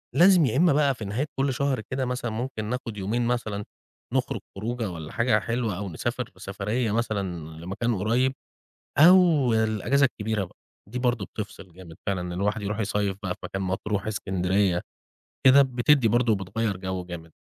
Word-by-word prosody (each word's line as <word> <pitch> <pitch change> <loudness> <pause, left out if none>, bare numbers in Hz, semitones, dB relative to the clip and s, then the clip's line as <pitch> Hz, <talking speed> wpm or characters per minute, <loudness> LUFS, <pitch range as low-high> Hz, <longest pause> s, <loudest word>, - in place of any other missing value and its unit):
لازم 175 0 +6
يا 130 +2 0
إمّا 170 -2 +5
بقى 140 -3 +3
في 110 - -6
نهاية 110 +8 -1
كلّ 135 0 +2
شهر 135 -2 0
كده 130 0 -1
مثلًا 125 -2 -2
ممكن 115 -1 -4
ناخد 115 -2 -4
يومين 115 +5 -1
مثلًا، 110 -4 -1 0.5
نخرج - - 0 0.2
خروجة 115 +2 -3
والّا 80 -3 -7
حاجة 115 -2 +2
حلوة، 115 -3 -2
أو 100 0 -4
نسافر 80 - -3
سفريّة 105 +4 -2
مثلًا 110 -2 0 0.4
لمكان 105 +6 -1
قريب، 120 +7 +1 0.7
أو 165 -6 +6
الإجازة 110 +6 +2
الكبيرة 110 -4 -2
بقى، 90 - -16 0.3
دي 125 - -3
برضه 120 -5 0
بتفصل 95 -4 -8
جامد 85 -2 -12
فعلًا 95 -3 0
إن 90 0 -4
الواحد 105 +4 -1
يروح 105 +1 -3
يصيّف 105 -2 0
بقى 90 -2 -2
في - - -26
مكان، 95 0 -3
مطروح، 95 +2 -2
إسكندرية، 95 -2 +1 0.7
كده 135 +2 +9
بتدي 130 0 +3
برضه 120 +1 +3
وبتغيّر 100 +1 -2
جو 95 -1 -4
جامد. 85 -2 -8
110 Hz, 170 wpm, -26 LUFS, 95-125 Hz, 0.7 s, كده